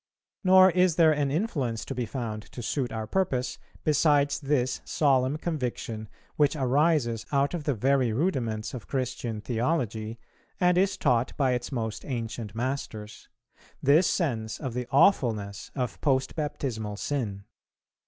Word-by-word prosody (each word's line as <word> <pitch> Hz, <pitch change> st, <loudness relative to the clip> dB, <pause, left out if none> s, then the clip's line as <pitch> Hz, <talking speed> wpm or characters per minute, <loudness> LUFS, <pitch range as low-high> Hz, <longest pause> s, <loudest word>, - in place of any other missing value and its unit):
Nor 185 Hz, 0 st, +7 dB
is 180 Hz, -2 st, +3 dB
there 165 Hz, -2 st, +6 dB
an 145 Hz, -2 st, +1 dB
influence 140 Hz, -, -1 dB
to -, -, -4 dB
be 120 Hz, -2 st, -3 dB
found 110 Hz, -4 st, -5 dB
to 120 Hz, -, -6 dB
suit 125 Hz, +3 st, -1 dB
our 110 Hz, -1 st, -3 dB
purpose, 130 Hz, -, -1 dB, 0.2 s
besides 145 Hz, -1 st, +3 dB
this 135 Hz, -3 st, 0 dB
solemn 135 Hz, -1 st, +2 dB
conviction, 125 Hz, -9 st, -4 dB, 0.3 s
which 145 Hz, 0 st, +3 dB
arises 135 Hz, -4 st, +2 dB
out 140 Hz, +1 st, +2 dB
of 165 Hz, -4 st, -4 dB
the 145 Hz, -, +1 dB
very 130 Hz, +1 st, +2 dB
rudiments 115 Hz, -, -1 dB
of 125 Hz, -4 st, -7 dB
Christian 125 Hz, -4 st, -3 dB
theology, 115 Hz, -3 st, -1 dB, 0.4 s
and 180 Hz, -1 st, +4 dB
is 190 Hz, +2 st, +2 dB
taught 120 Hz, +1 st, +1 dB
by 135 Hz, -3 st, +2 dB
its 125 Hz, +1 st, -2 dB
most 110 Hz, -4 st, -3 dB
ancient 115 Hz, -5 st, -5 dB
masters, 115 Hz, -4 st, -4 dB, 0.5 s
this 155 Hz, +6 st, +5 dB
sense 115 Hz, -, -1 dB
of 130 Hz, -5 st, -4 dB
the 125 Hz, 0 st, -3 dB
awfulness 115 Hz, -, +2 dB
of 125 Hz, -4 st, -3 dB
post 135 Hz, -2 st, +1 dB
baptismal 115 Hz, -9 st, -3 dB
sin. 105 Hz, -7 st, -3 dB
130 Hz, 145 wpm, -27 LUFS, 115-150 Hz, 0.5 s, Nor